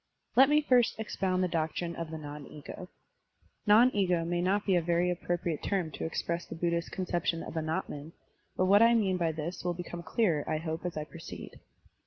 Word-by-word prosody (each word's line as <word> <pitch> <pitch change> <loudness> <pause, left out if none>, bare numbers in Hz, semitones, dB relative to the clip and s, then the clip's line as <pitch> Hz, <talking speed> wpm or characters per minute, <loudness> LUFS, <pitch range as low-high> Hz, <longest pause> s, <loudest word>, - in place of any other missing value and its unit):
Let 265 +1 +7
me 300 +1 +4
first 250 -4 +3
expotmd 190 -4 -1
the 185 - +2
doctrine 170 +1 -2
of 165 -1 -5
the 160 - -5
non 145 -2 -8
ego. 155 +4 -9 0.8
Non 225 +5 +7
ego 180 -4 +2
may 175 +1 0
not 195 +3 +1
be 190 - +3
a 175 - +3
very 175 +1 +1
appro 175 0 -1
priate 165 -3 -3
term 185 -6 -1
to - - -5
express 170 +1 -2
the - - -7
Buddhist 170 0 -1
conception 175 -2 -1
of - - -7
Anatman, 155 -1 -3 0.5
but 185 - +3
what 200 +3 +6
I 230 +1 +6
mean 195 -5 +2
by 170 -2 +1
this 160 +3 -5
will 175 -1 -1
become 175 0 -6
clearer, 170 -4 +1
I 155 - +1
hope, 160 +2 -3
as 175 - -6
I 155 - -1
proceed. 165 +2 -10
175 Hz, 205 wpm, -30 LUFS, 160-185 Hz, 0.8 s, Let